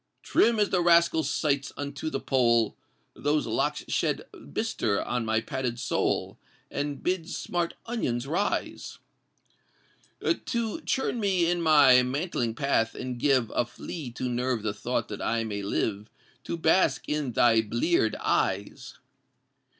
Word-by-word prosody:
Trim 230 -1 +3
as 205 - +2
the 180 - +2
Rascal 170 -1 +4
Sights 140 -3 0
unto 145 +2 -4
the - - -3
Pole, 120 -4 +2 0.4
Those 145 +1 0
locks - - -1
shed - - 0 0.3
bistre 100 +7 -1
on 120 -1 -2
my 110 0 +1
padded 125 -2 -3
soul, - - -1 0.3
And 145 -1 -3
bid 180 -2 -1
smart 175 -1 -2
onions 130 - -2
rise 170 +8 -2 1.5
To 235 +5 -2
churn 260 -2 0
me 190 -5 +2
in 175 0 +1
my 145 -6 +7
mantling 125 -3 -2
path 120 -4 +1
and 125 -1 -5
give 130 -5 +2
A - - +2
flea 125 +4 -7
to 130 +1 -3
nerve 125 -2 -1
the 105 -2 -1
thought 100 - -2
that - - -6
I 115 0 0
may 105 -2 -4
live 100 +1 -2 0.4
To 170 - -3
bask 165 +3 +2
in 150 -5 -2
thy 115 -1 +5
blear'd 115 +2 +1
eyes! 100 +2 -1
135 Hz, 140 wpm, -27 LUFS, 115-170 Hz, 1.5 s, my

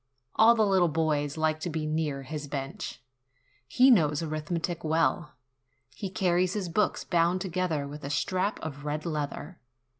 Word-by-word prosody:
All 230 +2 +6
the 220 -2 +3
little 190 -3 +3
boys 155 -2 0
like 155 0 +1
to 175 - -3
be 160 -1 -3
near 155 -3 -2
his 150 +2 -6
bench. 135 -2 -5 0.6
He 255 - +5
knows 150 - +3
arithmetic 165 +2 -3
well. 160 -2 0 0.6
He 190 +8 -5
carries 185 -1 +1
his 195 -4 -3
books 210 +5 0
bound 175 +1 +2
together 175 -5 -2
with 150 +1 -9
a 140 - -4
strap 185 +7 -1
of 145 -2 -6
red 150 +1 -3
leather. 155 +1 -4
160 Hz, 155 wpm, -28 LUFS, 150-185 Hz, 0.6 s, All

